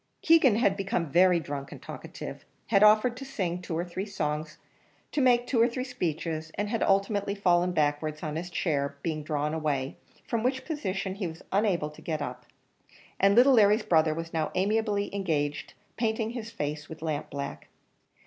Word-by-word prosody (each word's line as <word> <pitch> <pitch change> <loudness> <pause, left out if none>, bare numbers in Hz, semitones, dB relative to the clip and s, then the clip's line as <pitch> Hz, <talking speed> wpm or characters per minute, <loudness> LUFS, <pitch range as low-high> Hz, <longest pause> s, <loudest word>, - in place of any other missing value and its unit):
Keegan 315 -9 +6
had 210 -4 +3
become 195 -6 -2
very 180 +1 +5
drunk 140 -3 -6
and - - -9
talkative, - - -8 0.3
had 200 -3 +4
offered 215 +3 +6
to 270 - -7
sing 185 -10 -3
two 165 -3 -4
or 170 - -1
three 185 +3 -5
songs, 155 -5 -3 0.5
to 295 - 0
make 245 -2 +4
two 240 -3 +2
or 235 - +6
three 255 +1 -3
speeches, 160 - -3
and 205 0 -2
had 230 - -1
ultimately 200 +1 +1
fallen 180 -2 +2
backwards, 155 -1 0
on 155 -1 -3
his 175 +3 -4
chair 140 -5 -1
being 155 -2 -2
drawn 150 0 -2
away, 145 -4 -1 0.3
from 230 - -1
which 260 +2 -1
position 200 - -3
he 195 -2 -3
was 160 0 -9
unable 190 -7 +1
to 150 - -15
get 155 -2 -2
up, 125 -3 -6 0.7
and 200 +1 +5
little 255 +3 +7
Larry's 215 -1 +5
brother 160 -2 +3
was 165 0 -6
now 160 -1 0
amiably 205 +1 0
engaged 150 -7 -2 0.2
painting 225 -1 0
his 235 -2 -6
face 150 -6 -4
with 160 0 -9
lampblack. 145 -3 -4
180 Hz, 175 wpm, -28 LUFS, 155-215 Hz, 0.7 s, little